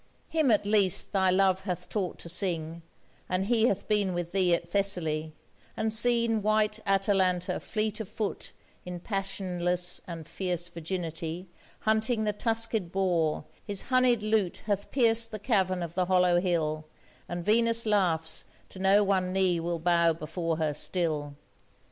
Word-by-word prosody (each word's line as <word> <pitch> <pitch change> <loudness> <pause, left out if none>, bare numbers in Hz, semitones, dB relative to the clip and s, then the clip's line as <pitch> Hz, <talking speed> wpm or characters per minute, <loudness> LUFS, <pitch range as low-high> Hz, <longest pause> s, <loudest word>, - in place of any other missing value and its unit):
him 315 -4 +2
at 210 -2 +3
least 200 -3 +2
thy 190 -2 +3
love 190 0 +3
hath 180 -4 -3
taught 195 -5 -2
to - - -9
sing, 170 -2 -2 0.5
And 185 +1 0
he 230 +1 +3
hath 200 -4 -1
been 205 -4 +1
with 175 -1 -3
thee 185 -2 +2
at - - -6
Thessaly, 160 -6 -1 0.4
And 220 0 0
seen 230 -1 +2
white 215 0 +1
Atalanta 190 -2 +1
fleet 215 0 -2
of 220 - -5
foot 215 -2 -4 0.3
In 180 -1 -6
passionless 180 -2 -2
and 165 -3 -7
fierce 175 0 -3
virginity 170 0 -5 0.3
Hunting 220 +1 +1
the 210 -1 0
tuskèd 225 -4 -1
boar, 175 -6 +1 0.2
his 200 -2 -2
honied 250 -3 +4
lute 215 -4 0
Hath 205 -1 -1
pierced 230 -3 +2
the 215 - -5
cavern 190 -5 +1
of 170 -1 -6
the 180 +1 +1
hollow 180 -1 +4
hill, 155 -4 -1 0.4
And 175 0 -4
Venus 230 +1 +3
laughs 175 -7 0 0.2
to 190 - -11
know 195 +2 +5
one 190 -2 +1
knee 185 -2 +2
will 170 +1 -2
bow 170 0 +3
before 165 +1 -3
her 155 -2 0
still. 150 -3 -2
185 Hz, 155 wpm, -28 LUFS, 175-210 Hz, 0.5 s, know